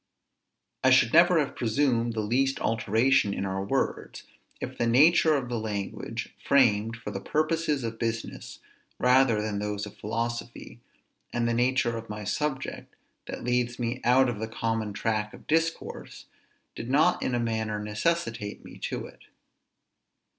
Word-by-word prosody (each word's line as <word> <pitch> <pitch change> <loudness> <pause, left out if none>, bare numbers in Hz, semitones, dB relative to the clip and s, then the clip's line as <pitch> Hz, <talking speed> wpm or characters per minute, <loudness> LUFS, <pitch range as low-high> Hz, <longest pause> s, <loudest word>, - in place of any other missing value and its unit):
I 130 - +6
should 130 -3 +5
never 175 +2 +6
have 145 -3 0
presumed 120 -1 +1
the 110 - -1
least 130 +6 +1
alteration 110 0 +2
in - - -2
our 95 0 -2
words, 100 - -2 0.4
if - - -5
the 120 - 0
nature 155 +6 +5
of 130 -3 -4
the 120 -2 -2
language, 105 -3 -5
framed 115 -5 +3
for 105 -2 -7
the 95 - -5
purposes 155 -1 0
of 115 -1 -4
business 115 -1 -4 0.4
rather 125 -3 +4
than 105 -2 -2
those 105 0 -3
of 105 - -11
philosophy, 115 - -4 0.5
and 120 -1 0
the 115 - +1
nature 120 0 +1
of 115 -1 -8
my 105 0 -5
subject, 135 +6 -3 0.3
that - - -6
leads 125 0 0
me 120 +1 -3
out 130 +2 +5
of 120 -4 -3
the 110 - -3
common 115 -1 -2
track 105 +1 -2
of - - -16
discourse, 165 +1 -2 0.5
did 115 - -6
not 155 +6 +3
in 125 - 0
a - - +1
manner 110 -2 -1
necessitate 105 - -2
me - - -12
to - - -4
it. - - -15
115 Hz, 155 wpm, -27 LUFS, 110-130 Hz, 0.5 s, I